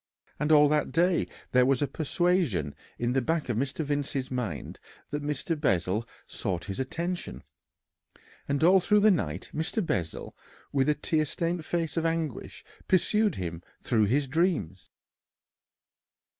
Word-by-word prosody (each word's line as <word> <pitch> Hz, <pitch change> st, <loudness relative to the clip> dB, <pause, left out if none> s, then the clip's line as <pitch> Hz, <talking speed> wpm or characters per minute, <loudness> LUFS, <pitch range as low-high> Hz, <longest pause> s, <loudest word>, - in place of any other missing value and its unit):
And 150 Hz, +1 st, +1 dB
all 150 Hz, -1 st, +7 dB
that 150 Hz, 0 st, +1 dB
day 175 Hz, +2 st, +2 dB, 0.2 s
there 125 Hz, 0 st, +5 dB
was 135 Hz, -2 st, +3 dB
a -, -, +1 dB
persuasion 155 Hz, -, 0 dB, 0.2 s
in 120 Hz, +1 st, 0 dB
the 135 Hz, -, +2 dB
back 160 Hz, +2 st, -1 dB
of 120 Hz, -, 0 dB
Mr. 140 Hz, +5 st, -2 dB
Vincey's 145 Hz, -2 st, -2 dB
mind 110 Hz, -, -4 dB, 0.3 s
that 145 Hz, 0 st, -2 dB
Mr. 150 Hz, +3 st, -2 dB
Bessel 100 Hz, -, 0 dB, 0.2 s
sought 90 Hz, -3 st, -3 dB
his 100 Hz, -2 st, -5 dB
attention, 170 Hz, +7 st, -4 dB, 1.0 s
and 140 Hz, +2 st, 0 dB
all 185 Hz, +3 st, +7 dB
through 210 Hz, +3 st, +3 dB
the 215 Hz, +1 st, +6 dB
night 90 Hz, -, -2 dB
Mr. 170 Hz, +6 st, -1 dB
Bessel 85 Hz, -, -3 dB, 0.4 s
with 135 Hz, +1 st, +2 dB
a 150 Hz, -, +3 dB
tear 155 Hz, +1 st, 0 dB
stained 170 Hz, +3 st, -2 dB
face 170 Hz, -1 st, -2 dB
of 165 Hz, -, +1 dB
anguish 165 Hz, -5 st, -3 dB, 0.2 s
pursued 210 Hz, +2 st, +3 dB
him 85 Hz, -2 st, -5 dB, 0.2 s
through 110 Hz, -4 st, +3 dB
his 135 Hz, +7 st, +2 dB
dreams. 130 Hz, -, -1 dB
145 Hz, 145 wpm, -28 LUFS, 120-165 Hz, 1.0 s, all